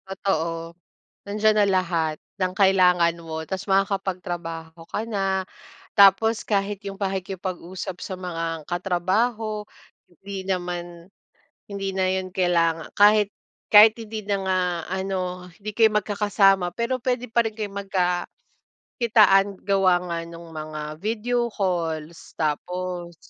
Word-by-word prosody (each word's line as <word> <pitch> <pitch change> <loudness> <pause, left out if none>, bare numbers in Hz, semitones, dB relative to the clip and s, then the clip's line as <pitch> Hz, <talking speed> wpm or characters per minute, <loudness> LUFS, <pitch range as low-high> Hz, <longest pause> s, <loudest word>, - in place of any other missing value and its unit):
Totoo. 165 -3 -2 0.5
Nandiyan 215 +1 +2
na 205 - +4
lahat 170 -5 0 0.2
ng 185 0 +1
kailangan 180 -4 +4
mo 160 -1 -5
tapos 190 +3 -5
makakapagtrabaho 175 -4 -2
ka - - -2
na. 195 -3 -1 0.5
Tapos 205 +3 +5
kahit 200 -1 0
'yong 200 -1 -7
pakikipag-usap 190 -1 -4
sa 190 - -5
mga 165 -3 -4
katrabaho 210 +6 0 0.5
hindi 190 +2 -8
naman 175 -2 -4 0.6
hindi 195 -1 -3
na 190 -1 +1
'yon 190 0 -2
kailanga 170 -3 +1
kahit 210 0 +5 0.4
kahit 215 +1 +9
hindi 220 -1 -6
na 200 -1 +1
nga 190 -1 +1 0.3
ano, 185 -1 -3
hindi 210 +4 -6
kayo 220 0 +3
magkakasama, 195 -3 +2
pero 245 +2 -1
puwede 250 -1 -2
pa 235 - +2
rin 220 - -8
kayo 210 -2 -4 1.1
magkakitaan 205 -5 +3
gawa 195 -2 +4
nga 170 -1 -3
nung 170 0 -11
mga 155 0 -6
video 235 +4 -1
calls. 170 -6 -3
Tapos 175 +3 -3
190 Hz, 120 wpm, -24 LUFS, 175-205 Hz, 1.1 s, kahit